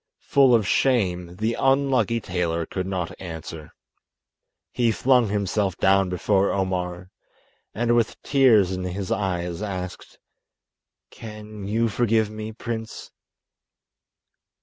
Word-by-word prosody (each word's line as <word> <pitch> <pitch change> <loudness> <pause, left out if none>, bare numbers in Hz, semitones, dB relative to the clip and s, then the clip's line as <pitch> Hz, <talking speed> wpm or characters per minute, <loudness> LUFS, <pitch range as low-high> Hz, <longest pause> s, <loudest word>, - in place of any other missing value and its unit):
Full 135 -3 +5
of 110 -4 +1
shame, 90 -9 +1
the 110 +4 -1
unlucky 135 -4 +2
tailor 85 -4 -2
could 95 +2 -4
not 90 -3 -3
answer. 80 -3 -8 1.0
He 120 -2 +2
flung 125 0 +3
himself 100 -2 -1
down 95 0 +3
before 95 +2 +1
Omar, 90 -1 -2 0.6
and 120 +2 +1
with 115 -2 0
tears 120 -9 +4
in 95 0 -3
his 95 +3 -4
eyes 90 -4 -2
asked: 95 -3 -6 0.9
"Can 105 -2 -9
you 115 +3 +1
forgive 110 -1 +1
me, 110 0 -6
prince?" 115 0 -6
100 Hz, 110 wpm, -24 LUFS, 90-115 Hz, 1.0 s, Full